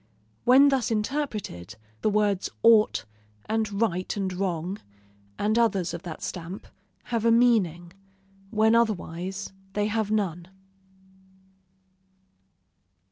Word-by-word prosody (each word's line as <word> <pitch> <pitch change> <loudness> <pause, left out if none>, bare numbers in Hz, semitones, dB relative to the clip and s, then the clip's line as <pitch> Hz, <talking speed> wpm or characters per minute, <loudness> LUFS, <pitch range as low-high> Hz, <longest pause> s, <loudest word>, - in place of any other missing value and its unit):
When 270 +3 +7
thus 260 -4 +1
interpreted, 210 - -3 0.3
the - - +2
words 205 -2 +1
ought, 220 - +5 0.4
and 215 -2 -1
right 185 -4 -1
and 190 -2 -2
wrong, 180 +1 -2 0.6
and 215 +3 +1
others 195 -6 +1
of 170 - -5
that 170 -4 -8
stamp, 175 +2 -6 0.5
have 230 -2 +1
a 230 - +4
meaning; 190 -8 +2 0.6
when 220 +1 +3
otherwise, 195 -4 -1 0.2
they 205 0 0
have 215 0 -1
none. 180 -5 -1
205 Hz, 105 wpm, -26 LUFS, 180-225 Hz, 0.6 s, When